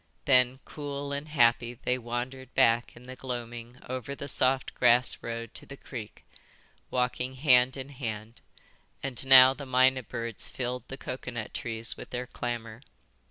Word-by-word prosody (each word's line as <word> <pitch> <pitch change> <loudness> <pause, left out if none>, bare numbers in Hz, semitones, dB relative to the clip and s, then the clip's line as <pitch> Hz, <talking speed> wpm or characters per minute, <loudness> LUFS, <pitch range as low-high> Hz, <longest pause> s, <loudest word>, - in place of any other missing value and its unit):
Then, 130 -1 +4
cool 145 -1 -5
and 140 +2 -4
happy, 120 -4 +3
they 125 +2 -1
wandered 125 +2 -5
back 115 +1 +3
in 120 - -14
the 130 +1 -8
gloaming 120 -1 -6
over 130 +2 -4
the 140 - -7
soft 130 0 +1
grass 120 0 +3
road 115 0 -5
to - - -9
the 140 - -9
creek, 115 -7 -9 0.6
walking 125 +1 -1
hand 130 -1 +4
in 135 +1 -6
hand, 115 -4 -6 0.6
and 135 -3 -2
now 130 0 +9
the 140 0 -9
mynah 130 +1 +4
birds 115 -3 -4
filled 125 0 -4
the 135 - -7
coconut 125 -4 -6
trees 115 0 -3
with - - -9
their 125 0 -3
clamour. 120 -2 -5
125 Hz, 155 wpm, -29 LUFS, 120-130 Hz, 0.6 s, now